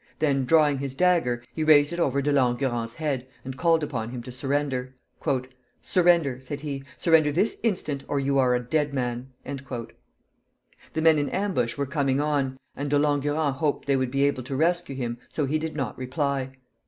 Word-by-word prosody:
Then 140 -4 +1
drawing 150 -1 +4
his 135 -1 -4
dagger, 160 -8 +2
he 155 - -2
raised 150 0 +5
it 170 - -4
over 140 -4 +1
De 145 - +1
Langurant's 120 -3 0
head, 140 -5 -2 0.2
and 130 0 -5
called 165 +2 +2
upon 115 -6 -3
him 120 -1 -6
to 125 - -8
surrender. 135 0 -2 0.8
"Surrender!" 170 -8 +3
said 140 +2 -6
he. 140 -2 -4
"Surrender 160 -3 +4
this 185 +9 0
instant, 155 -11 -1
or 145 - 0
you 140 0 +1
are 125 -1 +4
a - - +1
dead 145 +3 -1
man." 125 -1 -2 0.2
The 135 +3 -9
men 160 -2 +6
in 145 - -1
ambush 190 - -1
were 140 - 0
coming 140 -1 0
on, 145 -3 0 0.2
and 145 +1 -3
De 145 - +3
Langurant 145 0 +1
hoped 150 -1 -1
they 140 -1 +2
would 130 -1 0
be 140 +2 +1
able 140 -2 +1
to 130 +2 -5
rescue 170 -1 +1
him, 120 -2 -3
so 150 - -1
he 150 +3 0
did 160 0 -4
not 135 -7 -3
reply. 135 0 -2
140 Hz, 185 wpm, -26 LUFS, 130-150 Hz, 0.8 s, men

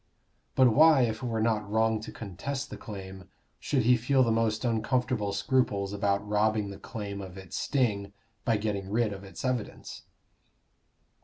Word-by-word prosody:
But 130 -3 +5
why, 155 -2 +7
if 110 -1 -1
it 125 - -3
were 115 -1 -1
not 105 -3 0
wrong 110 +1 +2
to - - -7
contest 115 +7 -5
the - - -5
claim, 95 -3 -9 0.3
should 135 -5 0
he 125 +2 +5
feel 130 +3 +3
the 115 - +2
most 110 +1 +1
uncomfortable 115 -1 0
scruples 100 -1 0
about 100 0 0
robbing 105 0 +1
the 100 - -9
claim 100 -2 -6
of 95 -1 -9
its 95 -2 -8
sting 105 -7 0 0.3
by 115 -2 +2
getting 100 -2 -3
rid 110 0 +1
of 100 0 -9
its 95 +6 -8
evidence? 125 -4 -3
110 Hz, 165 wpm, -29 LUFS, 100-120 Hz, 0.3 s, why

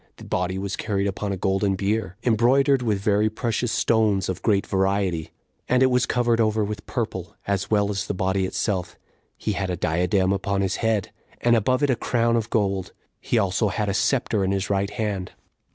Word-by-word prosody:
The - - -13
body 90 +1 -1
was 100 +1 -3
carried 100 -3 -1
upon 100 +1 -2
a 95 - -2
golden 95 +1 +1
bier, 100 0 -1
embroidered 130 +4 +3
with 110 -4 +1
very 105 +2 +2
precious 115 +1 -2
stones 105 -5 +2
of 95 -1 -3
great 100 -3 +2
variety, 95 -4 0 0.4
and 125 +1 +4
it 130 - +4
was 125 0 +2
covered 120 -1 +2
over 110 -1 +2
with 105 0 -5
purple, 105 -4 -4
as 100 0 -1
well 105 -1 +2
as 100 -2 -3
the 100 - -2
body 95 0 0
itself; 95 -1 -2 0.4
he 110 - -2
had 100 -2 -2
a 90 - -2
diadem 90 +4 +1
upon 100 0 -1
his 95 -1 0
head, 110 -4 0 0.3
and 120 0 +3
above 130 +5 +1
it 145 - +3
a - - +2
crown 115 0 +1
of 115 -1 -1
gold: 100 -4 -1 0.3
he 120 - -1
also 100 +1 +1
had 105 0 -1
a - - 0
scepter 110 -2 +1
in 95 - 0
his 100 0 -1
right 100 0 +1
hand. 105 -3 -3
100 Hz, 200 wpm, -24 LUFS, 95-110 Hz, 0.4 s, and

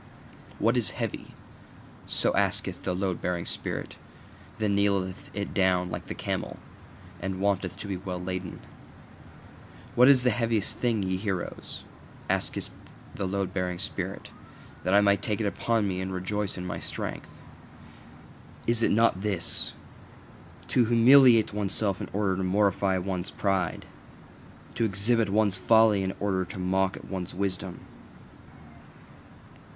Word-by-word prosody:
What 115 +3 +2
is 120 - -1
heavy? - - -4 0.7
so - - +2
asketh - - 0
the 90 - -2
load 95 -2 -2
bearing 90 -1 -2
spirit; - - -5 0.6
then 105 -2 +1
kneeleth 100 -2 0
it 100 -1 -3
down 90 -2 +2
like - - -5
the - - -5
camel, - - -3 0.6
and 95 0 -3
wanteth 95 -2 0
to 105 - -7
be 95 -2 -2
well 90 -1 -5
laden. 90 -1 -5 1.3
What 125 +1 +6
is 135 -3 +7
the 125 - +4
heaviest 115 -4 0
thing, 115 -5 +1
ye 95 0 -1
heroes? 95 -3 -4 0.5
asketh - - -2 0.4
the 95 - -3
load 95 -1 -2
bearing 90 -1 -1
spirit, - - -4 0.5
that 95 - +2
I 100 - +7
may 100 -1 +4
take 105 +2 -2
it 110 - 0
upon 110 +1 0
me 95 -1 -2
and 95 0 -3
rejoice 95 +2 -2
in 90 - -5
my 90 - -4
strength. - - -5 1.4
Is 115 -1 +2
it - - +3
not 110 -4 +3
this: 100 -5 0 1.0
To 125 - +4
humiliate 120 -1 +6
oneself 100 -1 -1
in - - -5
order 95 -2 0
to 95 - -1
mortify 95 0 +2
one's 95 0 -3
pride? 95 -4 -1 0.9
To - - -1
exhibit 110 +2 +1
one's 100 -2 +2
folly 110 0 +5
in 95 0 -2
order 95 -2 0
to 95 +2 -9
mock 95 +1 +1
at - - -10
one's 90 -2 -5
wisdom? 95 -1 -3
100 Hz, 140 wpm, -28 LUFS, 95-105 Hz, 1.4 s, is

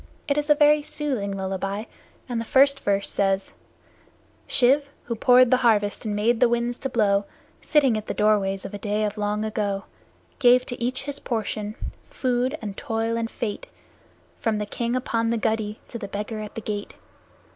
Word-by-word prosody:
It 280 - +2
is 295 +1 -1
a 295 - +7
very 295 0 +5
soothing 270 -9 -2
lullaby, 195 +1 -3 0.4
and 240 -3 -2
the - - -5
first 275 +3 +4
verse 200 -1 0
says: 195 -1 0 0.9
Shiv, 275 +3 +4
who 235 - -3
poured 250 +2 +5
the 255 - +6
harvest 220 -3 +2
and 210 -1 -1
made 225 +3 +2
the 245 - +5
winds 240 +1 -1
to 270 - -3
blow, 205 -4 +2 0.4
Sitting 275 -7 +3
at 215 0 -4
the - - -3
doorways 200 -2 +2
of - - -7
a 205 - -5
day 210 +1 -1
of 210 0 -4
long 210 +1 -1
ago, 205 -2 -2 0.6
Gave 250 -1 +5
to 245 - -7
each 255 +2 -1
his 285 0 -5
portion, 215 -2 -3 0.3
food 255 - 0
and 205 -2 -5
toil 225 +2 -2
and 230 0 -2
fate, 230 - -4 0.7
From 220 -2 0
the 210 - -2
King 235 +3 -2
upon 230 -2 0
the 235 - +1
guddee 220 -1 -1
to 235 - -6
the 200 - -5
Beggar 210 +2 -4
at 210 -1 -7
the 225 - -4
gate. 205 -1 -5
225 Hz, 185 wpm, -24 LUFS, 205-250 Hz, 0.9 s, a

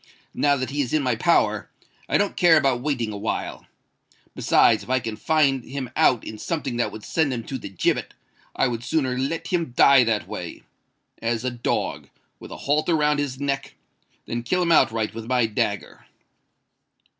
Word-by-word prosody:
Now 145 -1 +2
that 130 -1 -3
he 145 +1 0
is 125 - -3
in 155 -2 +2
my 125 -3 +1
power, - - +1 0.4
I - - +3
don't 205 - 0
care 170 -3 +5
about 135 -5 +1
waiting 125 -6 -2
a - - -5
while. 105 +2 -4 0.7
Besides, - - +3
if - - -12
I 130 0 +2
can 115 -2 -5
find 135 +1 +2
him 135 -3 -6
out 125 - +3
in 110 - -8
something 140 -6 -3
that 120 - 0
would 110 0 -9
send 160 -4 +1
him 120 -2 -3
to 130 +3 -5
the - - -8
gibbet, 95 - -1 0.4
I - - +2
would 120 -1 -4
sooner 130 -1 0
let 140 +6 -3
him 170 -8 -1
die 140 -2 +7
that 110 -2 -1
way—as 115 +1 -7
a 130 - 0
dog, 120 0 -2 0.3
with - - -11
a - - -7
halter 155 +4 +2
round 150 -1 +2
his 135 -3 -3
neck—than 135 -3 -6
kill 180 +10 0
him 170 - +1
outright 115 -8 +3
with 115 0 -7
my 125 -2 +2
dagger." 110 -2 -3
130 Hz, 180 wpm, -23 LUFS, 115-145 Hz, 0.7 s, die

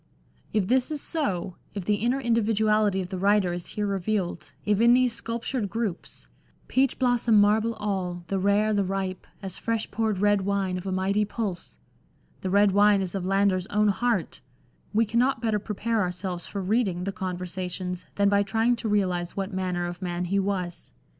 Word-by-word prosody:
If 210 -4 +1
this 255 +4 +2
is 305 -1 -2
so, 195 - -1 0.2
if 195 -3 -4
the 210 +1 +2
inner 240 +5 0
individuality 215 -4 +2
of 180 - -10
the 185 - -3
writer 200 -2 +3
is 175 -1 -5
here 210 - -2
revealed, 195 -3 -2
if 210 0 +2
in 235 +1 +6
these 250 -2 +3
sculptured 230 -1 -3
groups, 220 -5 -4 0.2
" - - -35
Peach 265 0 +2
blossom 245 -4 +3
marble 215 +3 +3
all, 190 -5 -3
the 195 - -1
rare, 205 +3 +2
the 200 -1 +2
ripe, 190 -1 -3 0.2
As 190 0 -5
fresh 225 0 -2
poured 220 -3 0
red 205 +1 +3
wine 195 -1 0
of 185 - -8
a - - -1
mighty 195 +3 +1
pulse," 205 -3 -4
LANDOR, - - -37
xi - - -33
the 190 - -2
red 200 +1 +4
wine 205 0 +5
is 185 -2 -3
of 190 -2 -3
Landor's 195 -1 +2
own 210 0 +2
heart, 220 -3 -1 0.5
we 225 +2 +3
cannot 235 +4 +1
better 220 -2 0
prepare 220 +2 -1
ourselves 180 -1 -3
for 200 -2 -4
reading 190 -3 0
the 195 - -2
Conversations 180 -1 -4
then 200 0 +3
by 200 0 +4
trying 225 +4 +2
to 230 -1 -3
realise 180 -4 0
what 195 +1 -3
manner 180 -2 -1
of 175 +2 -6
man 180 -1 -2
he 195 +3 +1
was. 185 -3 -3
200 Hz, 190 wpm, -26 LUFS, 185-220 Hz, 0.5 s, in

